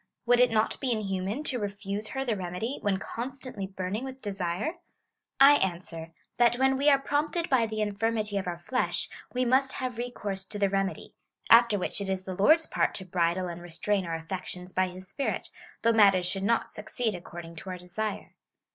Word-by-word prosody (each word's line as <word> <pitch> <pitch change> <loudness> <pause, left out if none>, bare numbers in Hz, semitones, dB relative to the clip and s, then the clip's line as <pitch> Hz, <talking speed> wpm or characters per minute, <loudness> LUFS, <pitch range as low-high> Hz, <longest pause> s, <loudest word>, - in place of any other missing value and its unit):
Would 245 0 +5
it 250 0 +6
not 220 -1 +1
be 265 -3 0
inhuman 200 +3 -2
to 260 -5 -2
refuse 205 0 -4
her 270 +3 -3
the 230 -4 0
remedy, 185 +7 -4
when 200 -2 +1
constantly 245 -1 -5
burning 190 +4 -3
with 265 0 -7
desire? 200 - -3 0.6
I 280 +1 +9
answer, 170 -3 -3 0.3
that 240 0 +5
when 265 +1 +3
we 280 +2 +4
are 275 -1 +5
jsrompted 300 +4 -1
by 240 -4 +4
the 215 0 -3
infirmity 210 0 0
of 190 - -5
our 175 -1 -2
flesh, 250 +9 -1 0.2
we 255 0 0
must 260 +2 +3
have 250 -3 -4
recourse 210 -6 -3
to 205 - -6
the 200 -1 +2
remedy; 195 0 -2 0.4
after 230 -2 +7
which 195 - -3
it 195 - -3
is 190 -1 -1
the 190 - -5
Lord's 310 - +5
part - - 0
to 190 - -4
bridle 180 0 0
and 175 0 -6
restrain 175 +3 -1
our 165 - -2
affections 180 +2 -6
by 185 0 +2
his 185 +1 -10
Spirit, 275 +8 -2 0.3
though 230 0 +4
mat 205 -3 +7
ters 185 -1 0
should 190 +2 -1
not 230 +3 +1
succeed 215 +1 -2
according 170 -1 -8
to 190 - -7
our 185 - -4
desire. 200 +4 -4
205 Hz, 195 wpm, -28 LUFS, 185-245 Hz, 0.6 s, I